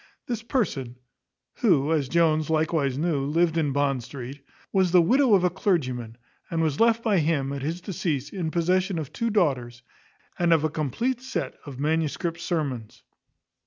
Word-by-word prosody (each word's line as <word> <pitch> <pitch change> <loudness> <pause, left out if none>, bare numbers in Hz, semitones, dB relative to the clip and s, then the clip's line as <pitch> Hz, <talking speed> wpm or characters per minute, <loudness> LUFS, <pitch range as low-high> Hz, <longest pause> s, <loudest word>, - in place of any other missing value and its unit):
This 235 -3 -3
person, 165 - -2 0.6
who, 155 - +3
as 145 -5 0
Jones 155 -2 +2
likewise 155 -4 +1
knew, 155 -3 0
lived 165 +3 +1
in 155 -4 +1
Bond 140 -2 +1
street, 135 +2 -8 0.3
was 190 -2 +3
the 180 +1 +6
widow 240 +6 +4
of 185 - +2
a 180 - +3
clergyman, 130 - -1 0.3
and 165 - -2
was 150 -3 -1
left 230 0 +3
by 210 -5 +3
him, 150 -3 0
at 140 - -4
his 165 +5 -3
decease, 160 -7 -3
in 175 -5 -2
possession 180 +3 +1
of 155 -4 -5
two 230 - -1
daughters, 125 - 0 0.6
and 170 -1 +4
of 160 -2 +3
a 155 - 0
compleat 230 - -1
set 260 - -3
of 135 -3 -8
manuscript 160 +3 -1
sermons. 140 - -3
160 Hz, 165 wpm, -25 LUFS, 140-180 Hz, 0.6 s, the